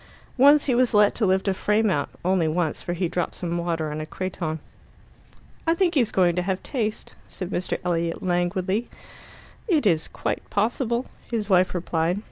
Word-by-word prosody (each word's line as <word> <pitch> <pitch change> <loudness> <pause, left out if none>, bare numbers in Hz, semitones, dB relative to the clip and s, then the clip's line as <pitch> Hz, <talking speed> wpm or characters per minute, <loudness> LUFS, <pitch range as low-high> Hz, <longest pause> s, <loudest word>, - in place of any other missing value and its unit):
Once 285 +2 +7
he 260 - +1
was 245 -2 +2
let 210 0 +5
to 215 - +1
lift 190 +2 +1
a 195 - +3
frame 210 +2 +1
out 145 -4 0 0.2
only 180 -3 +2
once, 160 0 -1
for 175 - -3
he 175 +1 -1
dropped 175 +1 -2
some 170 -1 -3
water 165 -3 -2
on 150 +1 -4
a - - -4
creton. 170 -4 -4 1.1
"I 330 - +4
think 355 -1 +2
he's 245 -8 +2
going 175 -3 +3
to - - +2
have 185 +1 -2
taste," 220 -6 -3
said 185 -1 -6
Mr. 180 - -1
Elliot 170 -1 -1
languidly. 185 +4 0 0.8
"It 320 - +2
is 165 -5 +2
quite - - -4
possible," 235 +3 0 0.2
his 220 -3 -2
wife 185 0 +4
replied. 175 +1 0
185 Hz, 180 wpm, -24 LUFS, 175-220 Hz, 1.1 s, Once